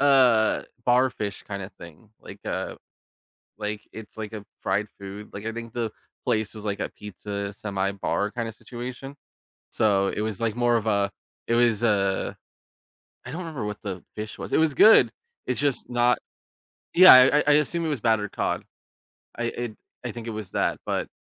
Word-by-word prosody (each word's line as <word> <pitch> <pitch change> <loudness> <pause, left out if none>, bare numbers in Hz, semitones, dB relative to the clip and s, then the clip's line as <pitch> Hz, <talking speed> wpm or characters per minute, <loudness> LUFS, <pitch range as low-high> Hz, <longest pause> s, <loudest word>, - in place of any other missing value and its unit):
uh, 130 -6 +5 0.2
bar 125 +1 +4
fish 100 -4 -5
kind 100 -1 -5
of 95 - -8
thing, 85 +5 -14
like, - - -11
uh, - - -3 0.8
like, 105 0 -4
it's, 110 0 -11
like, 110 0 -5
a 105 -2 -7 0.2
fried 100 +2 0
food, 100 +2 -8
like, 100 +2 -7
I 115 - -1
think 115 0 -7
the 115 -3 -2 0.3
place 110 0 0
was 110 -1 -9
like 100 -1 -2
a - - -2
pizza 100 0 -6
semi-bar 100 0 -1
kinda 115 -2 -3
situation, 125 +4 -8 0.5
so 100 -2 +2
it 105 - -3
was 110 -3 -3
like 115 -1 0
more 120 -1 +3
of 110 - -3
a 100 -1 +2 0.4
it 115 - +1
was 120 -2 +3
a 100 -3 +1 0.9
I - - -6
don't 165 +5 -5
remember 160 -9 -5
what 105 0 -5
the 95 -3 -5
fish 105 0 -6
was - - -7
it - - +4
was 160 -3 +3
good, 220 - +7 0.4
it's 125 - -1
just 145 -3 0
not 120 0 +3 0.8
Yeah, 185 -3 +11
I 130 +3 +8
I - - +2
I 150 - +6
assume 155 +3 +2
it - - 0
was 145 -7 -2
battered 110 -3 +1
cod. - - -1 0.7
I, 120 - -2 0.2
i 120 -3 -4 0.3
I 120 - -2
think 115 0 -8
it - - -2
was 105 -3 -6
that, - - 0
but - - -1
110 Hz, 185 wpm, -25 LUFS, 105-125 Hz, 0.9 s, Yeah